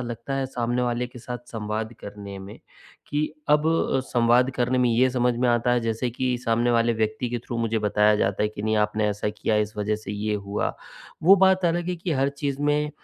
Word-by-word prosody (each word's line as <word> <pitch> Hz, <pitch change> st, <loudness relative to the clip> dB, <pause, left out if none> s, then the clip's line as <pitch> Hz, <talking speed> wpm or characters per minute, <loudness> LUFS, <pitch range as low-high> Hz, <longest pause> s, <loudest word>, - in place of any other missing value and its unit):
लगता 120 Hz, +4 st, -5 dB
है 135 Hz, -1 st, -1 dB
सामने 120 Hz, -1 st, -1 dB
वाले 120 Hz, 0 st, -1 dB
के 125 Hz, 0 st, -13 dB
साथ 125 Hz, +1 st, -6 dB
संवाद 110 Hz, 0 st, -3 dB
करने 100 Hz, -1 st, -8 dB
में 95 Hz, +2 st, -10 dB, 0.5 s
कि 150 Hz, +1 st, 0 dB, 0.2 s
अब 150 Hz, 0 st, +4 dB, 0.4 s
संवाद 120 Hz, +1 st, +3 dB
करने 125 Hz, +1 st, +1 dB
में 125 Hz, -, +3 dB
ये 125 Hz, +3 st, +4 dB
समझ 125 Hz, -1 st, +1 dB
में 125 Hz, +1 st, +1 dB
आता 120 Hz, +1 st, +2 dB
है 120 Hz, -, +2 dB
जैसे 115 Hz, +2 st, -2 dB
कि 125 Hz, +1 st, -1 dB
सामने 115 Hz, +1 st, +2 dB
वाले 115 Hz, 0 st, +3 dB
व्यक्ति 110 Hz, +2 st, -1 dB
के 120 Hz, -, -1 dB
थ्रू 120 Hz, -, -4 dB
मुझे 115 Hz, -1 st, 0 dB
बताया 105 Hz, 0 st, +3 dB
जाता 100 Hz, -1 st, 0 dB
है 105 Hz, -, +2 dB
कि 105 Hz, -1 st, -8 dB
नहीं 110 Hz, 0 st, +1 dB
आपने 105 Hz, 0 st, -1 dB
ऐसा 105 Hz, +1 st, -2 dB
किया, 110 Hz, +1 st, -1 dB
इस 105 Hz, 0 st, -1 dB
वजह 105 Hz, +1 st, 0 dB
से 105 Hz, -1 st, -7 dB
ये 105 Hz, +1 st, -2 dB
हुआ। 100 Hz, 0 st, -2 dB, 0.5 s
वो 195 Hz, +4 st, +8 dB
बात 190 Hz, -1 st, +3 dB
अलग 170 Hz, +1 st, 0 dB
है 180 Hz, -, -1 dB
कि 170 Hz, 0 st, -3 dB
हर 135 Hz, -1 st, +2 dB
चीज़ 140 Hz, 0 st, -4 dB
में 150 Hz, 0 st, +1 dB
120 Hz, 220 wpm, -24 LUFS, 105-130 Hz, 0.5 s, वो